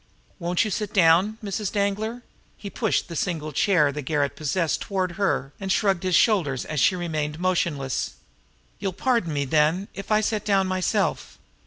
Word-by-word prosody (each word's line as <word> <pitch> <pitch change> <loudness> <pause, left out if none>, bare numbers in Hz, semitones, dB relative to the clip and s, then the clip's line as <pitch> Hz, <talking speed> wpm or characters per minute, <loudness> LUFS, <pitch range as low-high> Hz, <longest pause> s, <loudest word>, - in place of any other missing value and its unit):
"Won't 175 +4 +1
you 215 - -3
sit 210 0 -3
down 185 +4 +4
Mrs. 205 0 -3
Danglar?" 215 +4 -1 0.3
He 200 - -8
pushed 220 -4 0
the 170 - -7
single 155 -2 -2
chair 150 -2 +3
the 150 +1 -5
garret 145 0 -1
possessed 160 +2 -1
toward 190 -3 -1
her 175 -7 -1
and 195 -1 -3
shrugged 195 -3 +2
his 185 -2 +1
shoulders 165 - +2
as 155 -2 -3
she 185 - +4
remained 155 -3 -3
motionless. 165 -7 -1 0.7
"You'll 190 - -2
pardon 230 -3 0
me, 140 -1 -1
then, 155 +7 +1
if 195 +2 -8
I 215 0 +4
sit 215 -1 -1
down 195 -2 +2
myself." 185 -1 -1
185 Hz, 170 wpm, -24 LUFS, 155-200 Hz, 0.7 s, down